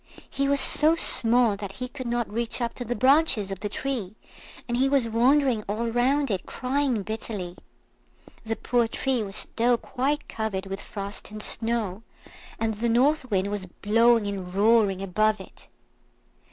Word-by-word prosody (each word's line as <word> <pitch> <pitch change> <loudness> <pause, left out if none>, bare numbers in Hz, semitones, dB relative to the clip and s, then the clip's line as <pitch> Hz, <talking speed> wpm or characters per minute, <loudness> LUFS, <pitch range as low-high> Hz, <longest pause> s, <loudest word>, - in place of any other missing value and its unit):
He 275 0 -1
was 280 0 +2
so 310 +4 +5
small 235 -7 +4
that 200 -1 -7
he 250 +3 -5
could 255 -1 -8
not 235 -1 -1
reach 230 +3 -3
up 235 -1 -2
to 245 - -6
the 245 +1 -3
branches 260 -7 +3
of 195 - -5
the 210 - -4
tree, 225 -5 -4 0.5
and 240 - -2
he 265 +2 +2
was 270 -4 +2
wandering 250 +1 +2
all 230 +3 -2
round 265 +3 +1
it, 190 -2 -3
crying 255 -4 -1
bitterly. 210 -4 -5 0.9
The 225 0 -3
poor 240 0 0
tree 255 +2 -1
was 200 -1 -6
still 240 +2 0
quite 280 +5 -2
covered 215 -4 -4
with 195 0 -6
frost 200 0 -7
and 215 0 -5
snow, 225 -4 -2 0.6
and 225 -1 0
the 230 +3 -2
North 255 +3 +2
Wind 200 -1 0
was 200 -2 -4
blowing 230 +4 +2
and 195 -3 -5
roaring 200 -1 +2
above 215 +3 +1
it. 190 - -13
230 Hz, 165 wpm, -25 LUFS, 205-255 Hz, 0.9 s, so